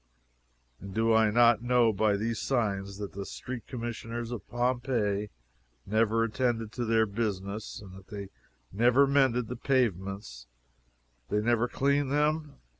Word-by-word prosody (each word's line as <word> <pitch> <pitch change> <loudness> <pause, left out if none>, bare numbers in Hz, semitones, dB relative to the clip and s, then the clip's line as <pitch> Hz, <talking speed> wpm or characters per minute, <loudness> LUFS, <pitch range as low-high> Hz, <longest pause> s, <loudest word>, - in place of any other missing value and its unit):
And 100 0 -9
do 115 0 +3
I 110 -1 +5
not 120 0 +5
know 120 -2 +3
by 105 0 +2
these 115 +1 -2
signs 100 -6 -1
that 100 -1 -6
Street 125 -2 -7
Commissioners 115 -1 -5
of 120 - -7
Pompeii 120 -4 0 0.6
never 110 +2 +2
attended 115 -1 -1
to 120 +1 -3
their 110 0 +3
business, 100 -1 -4
and 95 -3 -12
that 95 - -10
if 95 - -19
they 100 -2 -7 0.4
never 125 +6 +4
mended 135 -4 +2
the 125 - -5
pavements 100 - -1 0.8
they 105 - +1
never 120 +2 +2
cleaned 140 +2 +1
them? 150 +1 0
115 Hz, 140 wpm, -29 LUFS, 105-125 Hz, 0.8 s, I